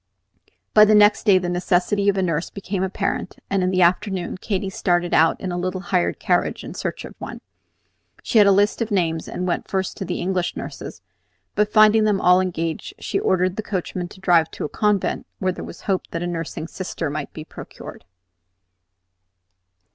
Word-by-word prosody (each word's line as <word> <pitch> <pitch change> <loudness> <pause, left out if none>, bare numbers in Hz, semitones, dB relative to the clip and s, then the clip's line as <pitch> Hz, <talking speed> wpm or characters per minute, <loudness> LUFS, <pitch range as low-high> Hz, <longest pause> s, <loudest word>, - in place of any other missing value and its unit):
By 210 - +8
the 215 0 +4
next 210 0 +5
day 195 -2 +7
the 180 -1 -1
necessity 180 +3 +1
of 195 - +1
a 190 - +1
nurse 165 -2 -1
became 195 -1 -4
apparent, 190 0 -2
and 195 -1 +2
in 180 - +1
the 185 -1 +3
afternoon 180 +1 +1
Katy 195 -2 -2
started 175 -4 0
out 160 +1 +4
in 185 - -4
a 175 - -2
little 185 +1 -2
hired 180 -1 +2
carriage - - 0
in - - -7
search - - -4
of - - -10
one. - - -7 0.8
She 225 - +3
had 205 - +7
a - - +6
list 205 +4 +2
of 230 - -1
names, 165 -6 0
and 180 - -4
went 175 - -2
first 190 -1 -2
to 195 - -4
the - - -3
English 180 -1 -1
nurses; - - -8 0.5
but 210 0 +1
finding 215 0 +6
them 205 -2 +2
all 180 0 +5
engaged, 165 -3 -3
she - - -2
ordered 185 0 +1
the - - -1
coachman 185 -3 -3
to 190 - -15
drive 175 -4 +3
to - - -5
a - - -4
convent 210 -2 0
where 185 -2 0
there - - -7
was - - -10
hope 190 -2 -1
that 165 +1 -4
a - - -1
nursing 165 -2 -4
sister 165 -4 -4
might 150 -1 -4
be 155 - -8
procured. - - -11
185 Hz, 195 wpm, -22 LUFS, 175-200 Hz, 0.8 s, By